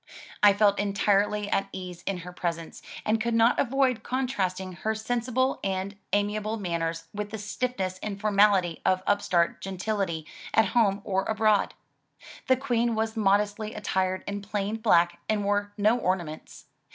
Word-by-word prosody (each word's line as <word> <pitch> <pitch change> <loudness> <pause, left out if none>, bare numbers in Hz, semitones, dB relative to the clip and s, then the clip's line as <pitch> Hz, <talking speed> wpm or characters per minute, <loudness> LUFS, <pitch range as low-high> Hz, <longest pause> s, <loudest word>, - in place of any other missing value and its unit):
I 205 -1 +7
felt 205 0 +3
entirely 205 +1 +1
at 195 - 0
ease 180 -2 -7
in 190 -3 -2
her 180 - -8
presence, 170 -2 -4 0.2
and 220 +1 +1
could 235 0 0
not 230 +1 +4
avoid 260 -3 +2
contrasting 195 -8 -2
her 220 +6 -2
sensible 245 +3 0
and 195 +1 -2 0.2
amia 205 +1 +1
able 215 +1 -3
manners 165 -4 -2
with 210 0 -4
the 220 - -5
stiffness 205 -3 -3
and 200 -2 -4
formality 200 -5 +3
of 185 0 +2
upstart 180 -4 +1
gentility 190 -4 -2 0.3
at 220 -3 +4
home 200 -3 +2
or 190 -1 0
abroad. 215 -2 +2 0.7
The 260 - +4
Queen 240 -3 0
was 220 +1 -1
modestly 210 +1 +1
attired 185 -3 -1
in 200 0 -4
plain 205 +1 -2
black, 175 -6 +3
and 215 -1 +1
wore 205 0 0
no 215 +4 +3
ornaments. 175 -6 -3
205 Hz, 150 wpm, -27 LUFS, 185-220 Hz, 0.7 s, I